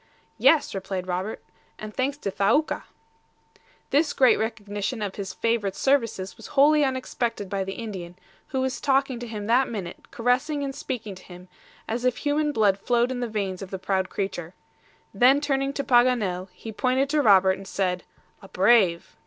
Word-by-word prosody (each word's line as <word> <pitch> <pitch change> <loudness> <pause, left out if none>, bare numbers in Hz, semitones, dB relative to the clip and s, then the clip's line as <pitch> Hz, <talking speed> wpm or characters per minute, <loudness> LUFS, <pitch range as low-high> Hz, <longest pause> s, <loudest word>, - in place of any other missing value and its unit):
"Yes," 320 -3 +4
replied 190 -1 -4
Robert; 185 +4 -4 0.3
"and 215 0 -8
thanks 270 +4 -1
to 200 - -4
Thaouka." 230 +12 +1 1.1
This 295 +2 +2
great 260 -2 +4
recognition 210 +1 -3
of 200 -2 -3
his 195 -2 -5
favorite's 220 -3 -1
services 230 -9 0
was - - -10
wholly 300 +2 +6
unexpected 250 -6 -2
by 195 -1 -1
the 195 0 -5
Indian, 190 -7 -7 0.3
who 265 -1 -2
was 260 0 -2
talking 270 -3 +1
to 240 - -6
him 210 -2 -5
that 245 +4 +3
minute, 190 -6 -7
caressing 265 +5 0
and 275 -1 -3
speaking 250 -7 -5
to 185 -1 -13
him, 180 0 -13 0.4
as 235 +2 -3
if 250 -1 +1
human 295 +1 0
blood 205 -6 +2
flowed 240 +3 +1
in 255 - -3
the 245 - -2
veins 200 -3 -3
of 195 - -7
the 190 - -4
proud 190 0 -1
creature. 180 -3 -4 0.6
Then 260 +3 +5
turning 275 -2 0
to 280 - -2
Paganel, 240 -8 +2
he 200 +5 -9
pointed 255 +5 +1
to 305 -1 +3
Robert, 190 -5 +5
and 195 - -10
said, 180 -3 -1 0.4
"A 195 - -12
brave!" 190 -3 +3
225 Hz, 175 wpm, -25 LUFS, 195-260 Hz, 1.1 s, wholly